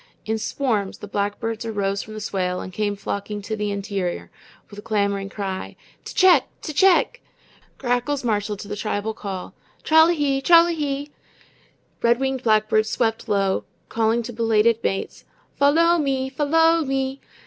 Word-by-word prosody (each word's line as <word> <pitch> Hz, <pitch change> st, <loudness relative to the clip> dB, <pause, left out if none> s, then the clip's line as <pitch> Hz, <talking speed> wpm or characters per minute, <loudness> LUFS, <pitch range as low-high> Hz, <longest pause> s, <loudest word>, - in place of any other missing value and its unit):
In 220 Hz, 0 st, -1 dB
swarms 215 Hz, -4 st, -1 dB
the 205 Hz, -, -9 dB
blackbirds 205 Hz, +3 st, -3 dB
arose 200 Hz, -3 st, -2 dB
from 215 Hz, -, -10 dB
the -, -, -5 dB
swale 185 Hz, -3 st, -2 dB
and 185 Hz, -, -7 dB
came 205 Hz, +1 st, -1 dB
flocking 200 Hz, +1 st, -4 dB
to 220 Hz, +2 st, -3 dB
the 210 Hz, -1 st, -2 dB
interior, 200 Hz, -3 st, -3 dB, 0.4 s
with 205 Hz, -, -9 dB
a -, -, -8 dB
clamoring 200 Hz, -2 st, -1 dB
cry: 195 Hz, -2 st, -5 dB, 0.3 s
"T'CHECK, 370 Hz, -1 st, +5 dB, 0.2 s
T'CHECK." 380 Hz, -, +3 dB, 0.6 s
Grackles 260 Hz, +3 st, -1 dB
marshaled 210 Hz, -2 st, -1 dB
to -, -, -9 dB
the 205 Hz, -, -4 dB
tribal 210 Hz, +1 st, -2 dB
call: 195 Hz, -4 st, -6 dB, 0.3 s
"TRALL 320 Hz, +1 st, +6 dB
A -, -, +3 dB
HEE, 280 Hz, -4 st, 0 dB
TRALL 335 Hz, +3 st, +7 dB
A 345 Hz, -, -1 dB
HEE." 290 Hz, -2 st, -3 dB, 0.9 s
Red 235 Hz, +1 st, +3 dB
winged 265 Hz, -1 st, -1 dB
blackbirds 215 Hz, -1 st, +2 dB
swept 225 Hz, -1 st, -1 dB
low, 195 Hz, -2 st, +1 dB, 0.3 s
calling 225 Hz, +1 st, +1 dB
to 240 Hz, +1 st, -7 dB
belated 225 Hz, 0 st, +2 dB
mates: 195 Hz, -, -3 dB, 0.4 s
"FOL 285 Hz, 0 st, +5 dB
LOW 335 Hz, +1 st, +4 dB
ME, 265 Hz, -2 st, -1 dB
FOL 295 Hz, +2 st, -2 dB
LOW 325 Hz, +2 st, +4 dB
ME." 270 Hz, 0 st, -2 dB
225 Hz, 160 wpm, -22 LUFS, 205-275 Hz, 0.9 s, TRALL